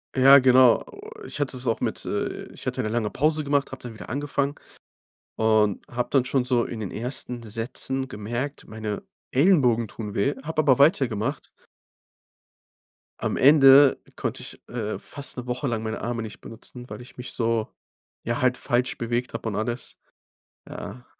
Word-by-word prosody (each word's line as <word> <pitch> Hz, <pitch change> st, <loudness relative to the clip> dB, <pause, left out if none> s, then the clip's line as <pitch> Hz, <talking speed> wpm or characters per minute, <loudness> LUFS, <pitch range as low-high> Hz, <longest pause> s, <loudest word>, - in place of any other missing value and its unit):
Ja, 135 Hz, +1 st, +8 dB
genau. 130 Hz, -2 st, +6 dB
O 420 Hz, +1 st, -11 dB, 0.2 s
ich -, -, -7 dB
hatte 140 Hz, -2 st, -2 dB
es 125 Hz, -, -6 dB
auch 115 Hz, -2 st, 0 dB
mit, -, -, -1 dB
äh -, -, -3 dB
ich -, -, -10 dB
hatte -, -, -1 dB
'ne 110 Hz, -, -2 dB
lange 110 Hz, -2 st, 0 dB
Pause 155 Hz, +2 st, +1 dB
gemacht, 140 Hz, -1 st, 0 dB
habe 130 Hz, -, -8 dB
dann 120 Hz, -2 st, -8 dB
wieder -, -, -10 dB
angefangen 140 Hz, +1 st, -1 dB, 0.8 s
und 110 Hz, -2 st, +2 dB
habe 120 Hz, 0 st, -1 dB
dann 135 Hz, -3 st, +4 dB
schon 125 Hz, 0 st, 0 dB
so 125 Hz, -2 st, +2 dB
in 115 Hz, -, -6 dB
den 105 Hz, -4 st, -5 dB
ersten 125 Hz, 0 st, -5 dB
Sätzen 125 Hz, +4 st, -4 dB
gemerkt, 120 Hz, +6 st, -5 dB
meine 110 Hz, -2 st, -5 dB, 0.3 s
Ellenbogen 125 Hz, -, +3 dB
tun 105 Hz, -3 st, -7 dB
weh, 135 Hz, +8 st, +1 dB
habe 155 Hz, 0 st, 0 dB
aber 140 Hz, -3 st, +3 dB
weitergemacht. 135 Hz, -, +2 dB, 1.7 s
Am -, -, -1 dB
Ende 140 Hz, -1 st, +7 dB, 0.2 s
konnte -, -, -3 dB
ich, -, -, -10 dB
äh, 110 Hz, -3 st, -3 dB
fast 140 Hz, -2 st, -7 dB
'ne 125 Hz, -, -5 dB
Woche 125 Hz, +3 st, -2 dB
lang 110 Hz, -3 st, -2 dB
meine 110 Hz, 0 st, -4 dB
Arme 115 Hz, -1 st, -2 dB
nicht 105 Hz, -, -9 dB
benutzen, 125 Hz, +2 st, -11 dB
weil -, -, -7 dB
ich 125 Hz, -, -15 dB
mich 125 Hz, -, -6 dB
so 115 Hz, -2 st, 0 dB, 0.6 s
ja, 120 Hz, +1 st, -2 dB
halt 125 Hz, 0 st, +2 dB
falsch 125 Hz, +1 st, 0 dB
bewegt 120 Hz, +1 st, -2 dB
hab 115 Hz, -, -6 dB
und 110 Hz, -3 st, -2 dB
alles. 120 Hz, +4 st, -3 dB, 0.7 s
Ja. 120 Hz, +5 st, -8 dB
125 Hz, 175 wpm, -25 LUFS, 115-135 Hz, 1.7 s, Ja